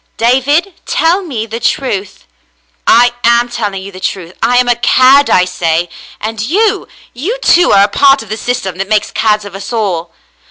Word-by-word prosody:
"David, 275 +10 +1
tell 340 +4 +1
me 260 - -5
the 230 +1 -6
truth." 205 -5 -3 0.6
"I 240 +1 +5
am 235 +1 +3
telling 205 -5 -4
you 200 - -9
the 185 - -11
truth. 185 -2 -5
I 245 +2 +2
ain 250 0 +2
a 245 - +3
cad, 260 +4 +4
I 180 - +3
say. 175 -1 -1 0.3
And 220 0 -5
you 395 - 0
— - - -27
you, 450 +9 -2
too, 355 +1 +4
are 195 - +5
a - - +3
part 275 +4 +3
of 220 - -16
the 215 - -4
system 195 -6 -4
that 195 +1 -3
makes 215 -1 0
cads 210 -1 0
of 200 - -10
us 195 +4 -8
all." 185 -7 -2
225 Hz, 195 wpm, -12 LUFS, 195-260 Hz, 0.6 s, I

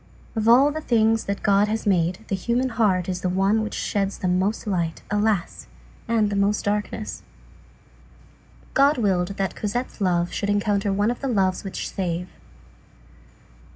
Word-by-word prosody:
Of 220 0 -1
all 260 +5 +6
the 315 +1 -4
things 225 -4 +2
that 200 0 -3
God 200 0 +4
has 220 +1 -2
made, 180 +1 +1
the - - -3
human 240 +7 0
heart 205 -6 +1
is 180 -1 -3
the 185 - 0
one 195 +4 +2
which 215 - -4
sheds 200 -1 -1
the 185 - -2
most 185 +6 0
light, 170 -5 -2
alas! 210 -3 0 0.4
and 220 -3 +1
the - - -1
most 200 +1 +1
darkness. 210 +1 -2 1.5
God 280 +2 +4
willed 195 -4 0
that 195 -1 -1
Cosette's 225 +2 -4
love 175 -2 +1
should 205 - -2
encounter 205 0 +1
one 205 +4 +1
of 245 - -5
the 275 - -2
loves 190 -6 +1
which 195 - -5
save. 180 -2 -3
205 Hz, 160 wpm, -23 LUFS, 190-220 Hz, 1.5 s, all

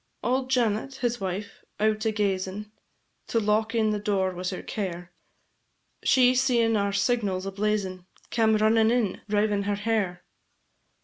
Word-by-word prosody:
Auld 255 +1 0
Janet, 245 +1 0
his 240 -3 -2
wife, 195 +3 -5 0.2
out 215 +1 +1
a 220 - +2
gazin', 200 0 -2 0.6
To 230 - +1
lock 220 +2 +1
in 220 -2 +2
the 210 - -1
door 195 -2 0
was 180 +1 -3
her 185 - -6
care; 180 -4 -5 0.9
She 255 -1 +5
seein' 245 -3 +2
our 200 -1 +1
signals 200 -2 0
a 195 - -3
blazin', 195 -3 -2 0.2
Came 220 -2 +3
runnin' 220 +1 +4
in, 235 -5 0
rivin' 205 -1 +1
her 205 0 0
hair. 205 -4 -1
210 Hz, 145 wpm, -26 LUFS, 195-225 Hz, 0.9 s, She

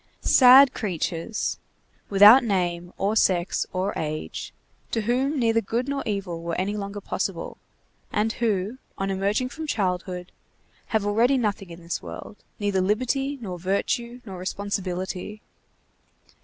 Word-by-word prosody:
Sad 260 +1 +8
creatures, 180 +1 -3 0.5
without 210 +6 +8
name, 175 -5 -1
or 200 +3 0
sex, 185 -4 +2
or 190 +2 -1
age, 155 - -4 0.4
to 225 - -1
whom 260 +7 0
neither 230 -2 +2
good 235 +5 -2
nor 280 0 -2
evil 195 -5 -3
were 170 0 -3
any 200 +3 -1
longer 200 0 -5
possible, - - -4 0.5
and 220 +2 0
who, 215 +1 -1 0.2
on 195 0 -1
emerging 200 +6 0
from 315 +3 -7
childhood, 180 -5 -2 0.6
have 220 -3 0
already 230 +6 +3
nothing 205 -5 -2
in 170 0 -11
this 170 - -3
world, 210 - -9 0.2
neither 200 -2 0
liberty, 255 +8 0
nor 180 -4 -5
virtue, 235 +6 -2
nor 190 -4 -8
responsibility. 190 +1 -4
205 Hz, 130 wpm, -25 LUFS, 185-235 Hz, 0.6 s, Sad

